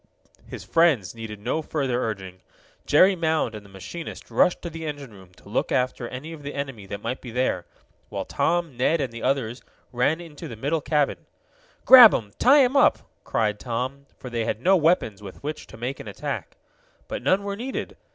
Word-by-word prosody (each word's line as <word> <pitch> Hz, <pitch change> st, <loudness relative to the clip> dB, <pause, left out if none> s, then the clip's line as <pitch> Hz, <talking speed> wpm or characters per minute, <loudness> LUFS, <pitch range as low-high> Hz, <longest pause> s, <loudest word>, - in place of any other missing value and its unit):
His -, -, -8 dB
friends 155 Hz, -, +2 dB
needed 110 Hz, -2 st, -8 dB
no 155 Hz, +9 st, -1 dB
further 135 Hz, -5 st, -1 dB
urging. 95 Hz, -4 st, -5 dB, 0.5 s
Jerry 185 Hz, +6 st, +6 dB
Mound 160 Hz, -8 st, 0 dB
and 105 Hz, -1 st, -8 dB
the 100 Hz, -, -16 dB
machinist 100 Hz, -, -8 dB
rushed 180 Hz, -, +2 dB
to 170 Hz, -, -4 dB
the 165 Hz, 0 st, -7 dB
engine 145 Hz, -6 st, -6 dB
room, 95 Hz, -2 st, -15 dB
to -, -, -19 dB
look -, -, -1 dB
after 125 Hz, -1 st, 0 dB
any 140 Hz, +7 st, -7 dB
of 155 Hz, -, -10 dB
the 145 Hz, 0 st, -7 dB
enemy 135 Hz, -8 st, -5 dB
that 100 Hz, +1 st, -7 dB
might 120 Hz, +3 st, -3 dB
be 125 Hz, -, -8 dB
there, 115 Hz, -7 st, -1 dB, 0.4 s
while -, -, -4 dB
Tom, 170 Hz, -4 st, 0 dB
Ned 140 Hz, +7 st, +2 dB
and 130 Hz, -5 st, -2 dB
the 115 Hz, -, -7 dB
others 125 Hz, -3 st, -1 dB, 0.3 s
ran 130 Hz, +6 st, +1 dB
into 165 Hz, -4 st, -9 dB
the 115 Hz, -, -8 dB
middle 145 Hz, +8 st, -1 dB
cabin. 150 Hz, -1 st, 0 dB, 0.6 s
"Grab 250 Hz, -4 st, +10 dB
'em! 105 Hz, -3 st, -4 dB
Tie 275 Hz, +2 st, +7 dB
'em 255 Hz, +2 st, +1 dB
up!" 280 Hz, -, +4 dB, 0.2 s
cried 105 Hz, -2 st, 0 dB
Tom, 130 Hz, +4 st, -4 dB
for 125 Hz, -, -9 dB
they 115 Hz, -1 st, -1 dB
had -, -, -2 dB
no 185 Hz, +9 st, +4 dB
weapons 155 Hz, -, +2 dB
with 100 Hz, +3 st, -11 dB
which 150 Hz, +1 st, -5 dB
to -, -, -12 dB
make 125 Hz, +4 st, -4 dB
an -, -, -9 dB
attack. 100 Hz, -, -5 dB, 0.5 s
But -, -, -4 dB
none 190 Hz, +2 st, +2 dB
were 200 Hz, 0 st, -3 dB
needed. 250 Hz, +5 st, -5 dB
135 Hz, 200 wpm, -24 LUFS, 115-165 Hz, 0.6 s, Grab